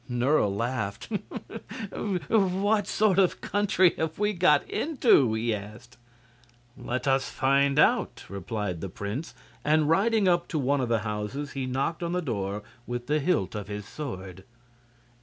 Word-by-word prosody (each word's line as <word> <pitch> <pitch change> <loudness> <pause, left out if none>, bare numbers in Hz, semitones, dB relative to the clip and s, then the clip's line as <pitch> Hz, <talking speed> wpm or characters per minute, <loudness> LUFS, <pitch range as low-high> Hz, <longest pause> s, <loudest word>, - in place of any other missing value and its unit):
Nerle 125 -1 +2
laughed. 100 -1 -3 0.8
"What 200 +2 +1
sort 205 -3 +3
of 185 -2 +3
country 190 -3 +2
have 160 0 -2
we 210 +1 +1
got 170 -6 +3
into?" 230 - +3
he 115 +1 0
asked. 105 +4 -8 0.8
"Let 125 +3 -4
us 135 0 +2
find 140 +1 +2
out," 150 - +3
replied 100 -2 -4
the 95 - -4
prince, 100 - -5 0.3
and 155 0 +3
riding 205 +5 +3
up 175 -1 +2
to 160 - -3
one 140 0 +1
of 125 - -1
the 115 -2 +2
houses 105 +7 -3
he 135 -2 -3
knocked 135 +7 -1
on 170 0 -2
the 180 - +1
door 100 -6 -3 0.2
with 120 0 -4
the 150 +2 +1
hilt 150 - 0
of 105 -3 -5
his 105 0 -5
sword. 95 - -7
135 Hz, 150 wpm, -27 LUFS, 105-175 Hz, 0.8 s, sort